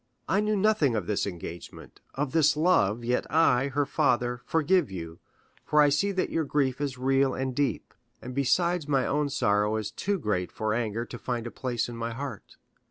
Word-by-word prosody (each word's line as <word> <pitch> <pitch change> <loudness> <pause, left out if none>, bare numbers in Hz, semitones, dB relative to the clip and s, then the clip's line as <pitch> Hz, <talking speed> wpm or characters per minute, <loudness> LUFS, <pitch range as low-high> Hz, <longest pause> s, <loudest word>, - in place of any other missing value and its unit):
I 190 +7 +2
knew 210 0 +1
nothing 195 - +2
of 105 -5 -1
this 100 +1 -1
engagement, 85 -2 -9
of 140 -1 -2
this 150 -2 +3
love, 120 - +2
yet 125 +1 -1
I, 140 -5 +3
her 140 +1 0
father, 125 -4 0
forgive 165 - +2
you, 85 -3 -7 0.4
for 150 - +2
I 145 -1 +6
see 200 +8 +1
that 185 - -1
your 165 - 0
grief 140 -2 0
is 140 -3 -2
real 135 +1 +2
and 130 0 -2
deep; 145 0 -1 0.3
and 125 - -8
besides 160 +5 +1
my 135 -3 +2
own 150 0 0
sorrow 105 -4 +1
is 110 -1 -3
too 200 - -1
great 105 - -2
for 110 -1 -2
anger 115 0 -2
to 120 - -9
find 120 -2 -3
a 120 - -5
place 120 -3 -2
in 120 -1 -7
my 115 0 -3
heart. 135 -4 -7
130 Hz, 195 wpm, -27 LUFS, 115-150 Hz, 0.4 s, I